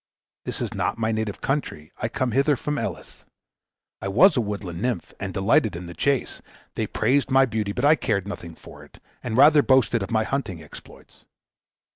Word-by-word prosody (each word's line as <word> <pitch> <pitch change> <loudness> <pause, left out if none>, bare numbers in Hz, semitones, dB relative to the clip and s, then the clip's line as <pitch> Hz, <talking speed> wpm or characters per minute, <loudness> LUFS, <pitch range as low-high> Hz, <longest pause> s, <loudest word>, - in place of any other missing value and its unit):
This - - -5
is - - -3
not - - -1
my 110 -1 0
native 110 -2 -3
country; 125 - -3
I 110 - -1
came 130 +1 -2
hither 140 +4 +2
from 150 +3 -3
Elis. - - -6 0.8
I 95 - -3
was 150 - +5
a 125 - +2
woodland 100 -5 -5
nymph, 120 -7 -2
and 95 -1 -4
delighted 100 +1 +2
in 90 +1 -7
the 85 - -8
chase. 140 +6 -1 0.3
They - - -2
praised 130 +5 +1
my 135 0 +5
beauty, 110 -4 -2
but 125 +6 -1
I 150 - +7
cared 100 - -1
nothing 85 -5 -7
for - - -14
it, - - -18 0.2
and 115 -1 -3
rather 145 +2 +7
boasted 125 -4 +3
of 95 - -4
my 110 -1 +1
hunting 110 -9 -3
exploits. 80 -2 -15
110 Hz, 190 wpm, -24 LUFS, 100-135 Hz, 0.8 s, I